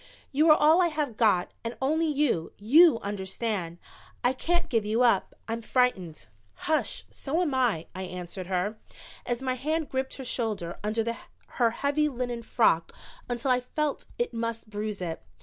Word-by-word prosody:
"You 305 +4 +4
are 305 - +8
all 315 +4 +5
I 350 - +4
have 300 -7 -2
got 205 -6 +2
and 230 +1 -5
only 315 +5 +1
you 285 - 0
you 270 +5 +6
understand. 195 -2 -3 0.5
I 245 - +3
can't 340 +5 0
give 225 -7 +1
you 220 +4 +1
up. 230 -6 +2
I'm 230 +1 -3
frightened." 220 - 0 0.4
"Hush 315 0 0
so 300 +4 -2
am 335 -6 0
I," 240 -11 +1
I 185 - -6
answered 180 0 -6
her, 190 +4 -1 0.5
as 240 +1 -2
my 260 -1 0
hand 310 +4 -2
gripped 265 0 -2
her 265 - -7
shoulder 215 -9 -3
under 225 +2 -1 0.5
her 235 - +6
heavy 285 +5 +1
linen 245 -3 -3
frock 220 -7 +2 0.4
until 245 +2 0
I 250 - +4
felt 290 +4 -3
it 480 0 -1
must 230 -1 -4
bruise 210 -2 -3
it. 165 -2 -4
235 Hz, 165 wpm, -28 LUFS, 210-285 Hz, 0.5 s, are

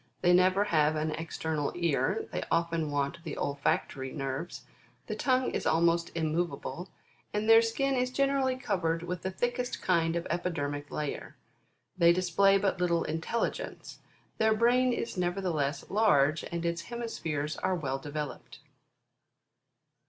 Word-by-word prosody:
They 175 0 +5
never 185 +2 +4
have 155 -5 +2
an 155 +1 -1
external 160 -2 -3
ear; 175 - 0
they - - -2
often 165 -2 0
want 145 +4 -2
the 155 -4 -5
olfactory 135 -1 -1
nerves; 135 +4 -4 0.4
the - - -4
tongue 255 -1 +1
is - - -2
almost 170 +1 +2
irnmoveable, 170 +2 -2 0.5
and 210 +1 0
their 225 0 +8
skin 270 +4 0
is 250 -1 +1
generally 275 0 +1
covered 180 -10 -1
with 175 0 -4
the 190 - -2
thickest 245 +5 -2
kind 165 -2 +2
of 170 - -2
epidermic 145 -4 -2
layer. 150 -2 -4 0.6
They 170 0 +7
display 185 +2 +3
but 195 -2 0
little 170 -1 +2
intelligence. 165 +9 -3 0.4
Their 220 0 +4
brain 245 +3 +3
is 235 -3 -3
nevertheless 175 -6 -1
large, 165 -8 +3
and 170 0 -4
its 170 0 -1
hemispheres 165 -11 -3
are 185 - 0
well 135 -5 -2
developed. 150 +1 -6
170 Hz, 135 wpm, -30 LUFS, 155-210 Hz, 0.6 s, their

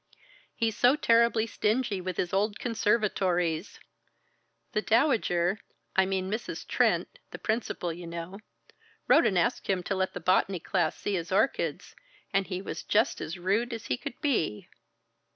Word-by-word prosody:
"He's 225 -2 0
so 250 +3 +5
terribly 230 -4 +3
stingy 215 -2 0
with 185 -1 -4
his 175 - -1
old 205 +2 +1
conservatories. 195 -7 0 0.9
The 215 - 0
Dowager 215 - +2 0.4
I 190 0 +4
mean 190 -1 -1
Mrs. 220 +4 -4
Trent, - - +1
the - - -8
principal, 220 -6 -2
you 170 +1 -9
know 170 +3 -6 0.7
wrote 330 - +6
and 190 - +1
asked 235 +8 0
him 185 -2 0
to 195 - -2
let 190 0 -1
the - - -3
botany 185 +1 +2
class 170 -1 0
see 205 - -3
his 175 0 -3
orchids, 210 +8 0 0.4
and 195 -1 +2
he 185 0 -4
was - - -5
just 220 +5 +1
as 165 +4 -5
rude 205 +7 0
as 225 - -6
he - - +2
could - - -7
be!" 190 - 0
195 Hz, 155 wpm, -28 LUFS, 180-225 Hz, 0.9 s, wrote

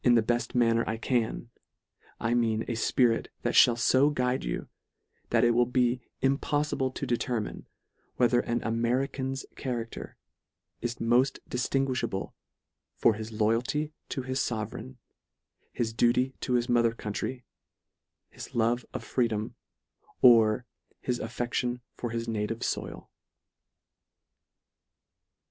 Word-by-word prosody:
31 120 -1 +5
the 115 +1 +3
beft 120 - -3
manner 115 -1 +3
I 110 - -1
can, 120 0 -1 0.7
I 115 +1 0
mean 115 -2 +1
a 120 - -3
fpirit 115 +1 +2 0.2
that - - 0
fhall 120 -1 +6
fo 130 +4 +4
guide 125 -3 0
you, - - -3 0.6
that - - +3
it 120 - +5
will 120 +1 +3
be 125 0 +1 0.2
impoflible 135 -1 0
to - - -3
determine, 120 -2 -2 0.5
whether 120 0 +3
an 120 0 -1
American's 130 +3 -1
cha 135 - -5
racter 115 -2 -4 0.7
is 120 0 -2
moft 125 +4 +2
diftinguifhable 125 -5 -1 0.6
for 115 - +4
his 110 +1 -6
loyalty 115 +8 0 0.2
to 135 - -3
his 130 +1 -2
fovereign, 115 +3 -4 0.8
his 115 -2 -2
duty 125 +3 +2
to 125 - -2
his 120 0 +2
mother 120 -2 +3
coun 105 -2 -5
try, 125 +3 -4 0.9
his - - -10
love 120 +1 +2
of - - -4
freedom, 110 -4 -1 0.7
or 115 -1 +6 0.3
his 125 -1 -2
affection 120 +1 -2 0.2
for 120 - -4
his 115 0 -3
native 115 +1 -2
foil. - - -4
120 Hz, 125 wpm, -28 LUFS, 115-125 Hz, 0.9 s, fhall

